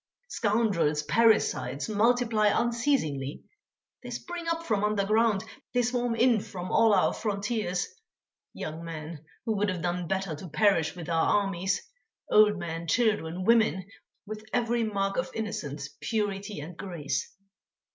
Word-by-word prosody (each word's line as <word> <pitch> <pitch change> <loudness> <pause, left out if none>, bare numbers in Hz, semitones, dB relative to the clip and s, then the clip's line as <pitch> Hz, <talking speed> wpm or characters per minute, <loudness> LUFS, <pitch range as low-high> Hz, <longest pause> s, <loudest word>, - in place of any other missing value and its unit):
scoundrels, 205 - +1
parricides 220 - +2
multiply 225 0 +2
unceasingly; 225 - 0 0.6
they - - -8
spring 345 -1 -6
up 330 0 -1
from 215 -9 0
underground, 210 0 +2 0.3
they 245 - +4
swarm 245 -1 0
in 235 -1 +4
from 185 -2 -6
all 225 -1 +5
our 190 -3 +3
frontiers, 205 -3 -1 0.7
young 160 +2 -6
men, 160 -1 -7 0.2
who 220 - 0
would 205 0 +1
have 180 -2 -3
done 175 0 -1
better 190 -1 -1
to 160 +4 -8
perish 175 -2 +2
with 175 -3 -7
our 170 +5 +3
armies, 195 0 -1 0.5
old 210 -1 +6
men, 170 -1 -5
children, 185 -4 +1
women, 220 -5 +3 0.4
with 215 0 -7
every 235 -1 +1
mark 195 -2 -1
of 260 - -1
innocence, 155 -11 -4
purity, 205 -3 -2
and 165 +4 -8
grace. 165 -7 -4
200 Hz, 135 wpm, -28 LUFS, 170-225 Hz, 0.7 s, old